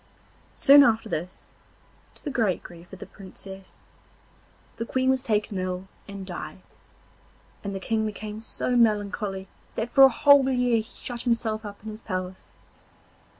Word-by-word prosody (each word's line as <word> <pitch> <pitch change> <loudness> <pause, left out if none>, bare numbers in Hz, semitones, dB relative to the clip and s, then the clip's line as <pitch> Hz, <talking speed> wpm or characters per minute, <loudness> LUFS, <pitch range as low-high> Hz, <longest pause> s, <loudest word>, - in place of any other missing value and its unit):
Soon 280 +1 +8
after 225 -3 +2
this, 180 -2 -5 0.7
to - - -16
the 290 - -3
great 220 -8 0
grief 175 0 -13
of 190 - -9
the - - -9
Princess, 195 -1 -12 0.9
the - - -2
Queen 260 0 +2
was 265 -1 +1
taken 210 -5 -1
ill 185 0 -3 0.2
and 200 -1 -7
died, 185 0 -7 1.0
and 200 -1 -4
the - - -3
King 220 +3 -1
became 215 0 -6
so 235 +2 -2
melancholy 205 -3 +1 0.3
that 225 +2 -3
for 270 - +7
a 270 - +10
whole 275 +2 +5
year 245 -2 +2
he - - +1
shut 240 +1 -7
himself 230 -3 0
up 205 -1 -9
in 220 - -6
his 215 +1 -10
palace. 185 -1 -5
215 Hz, 155 wpm, -26 LUFS, 195-240 Hz, 1.0 s, a